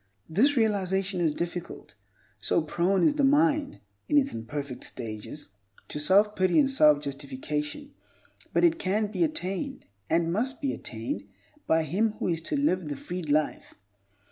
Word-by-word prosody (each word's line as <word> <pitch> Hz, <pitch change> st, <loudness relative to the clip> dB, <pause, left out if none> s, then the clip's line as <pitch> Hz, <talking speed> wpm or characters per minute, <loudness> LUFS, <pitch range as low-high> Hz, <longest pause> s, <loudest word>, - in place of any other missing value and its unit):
This 255 Hz, -, +3 dB
realization 195 Hz, -4 st, +1 dB
is 155 Hz, -3 st, +1 dB
difficult, 175 Hz, 0 st, -5 dB, 0.5 s
so 155 Hz, +9 st, +1 dB
prone 180 Hz, +4 st, +1 dB
is 305 Hz, -, +5 dB
the 295 Hz, -1 st, 0 dB
mind, 290 Hz, +1 st, +3 dB, 0.3 s
in 295 Hz, -, +4 dB
its 275 Hz, -1 st, +2 dB
imperfect 125 Hz, +3 st, -5 dB
stages, 115 Hz, +5 st, -6 dB, 0.4 s
to -, -, -4 dB
self 200 Hz, +7 st, +4 dB
pity 185 Hz, -1 st, +2 dB
and 285 Hz, -, +5 dB
self 150 Hz, -, +5 dB
justification, 145 Hz, -, -5 dB, 0.6 s
but -, -, +2 dB
it 335 Hz, -1 st, +4 dB
can 205 Hz, +2 st, 0 dB
be 340 Hz, -, +1 dB
attained, 275 Hz, -, -2 dB, 0.2 s
and 170 Hz, 0 st, +2 dB
must 255 Hz, +7 st, -1 dB
be 275 Hz, -2 st, -1 dB
attained 110 Hz, -4 st, -5 dB, 0.4 s
by 160 Hz, 0 st, +3 dB
him 210 Hz, +8 st, 0 dB
who -, -, -3 dB
is 165 Hz, -1 st, -1 dB
to 285 Hz, -, -2 dB
live 185 Hz, -, +1 dB
the 145 Hz, -, -4 dB
freed 175 Hz, -1 st, -6 dB
life. 150 Hz, +1 st, 0 dB
185 Hz, 155 wpm, -27 LUFS, -, 0.6 s, is